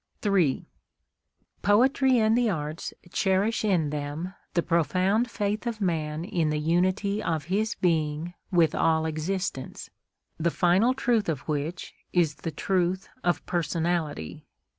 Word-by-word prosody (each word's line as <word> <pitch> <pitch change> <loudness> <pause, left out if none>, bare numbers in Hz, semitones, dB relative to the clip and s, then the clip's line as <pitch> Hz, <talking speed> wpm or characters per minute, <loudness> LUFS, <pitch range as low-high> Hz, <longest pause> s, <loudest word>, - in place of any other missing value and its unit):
III 185 -9 +2 1.0
Poetry 255 +5 +4
and 220 0 +3
the 240 -1 +2
arts 155 -3 -3 0.2
cherish 195 +5 +1
in 175 -8 +1
them 150 +5 -4 0.2
the 170 - +2
profound 185 - +1
faith 210 +1 -2
of 230 -2 -3
man 160 -4 -1
in 175 -6 0
the 150 - 0
unity 185 +6 +1
of 160 -6 -1
his 215 +2 +1
being 160 -1 0 0.2
with 170 -3 +4
all 160 -1 +2
existence, 160 -2 -3 0.5
the 170 +1 +2
final 190 +9 +3
truth 235 -7 +1
of 150 -5 -1
which 155 +3 -4 0.2
is 170 -4 +3
the 145 +3 -5
truth 185 +3 -1
of 175 - 0
personality. 165 - -2
175 Hz, 130 wpm, -27 LUFS, 155-205 Hz, 1.0 s, Poetry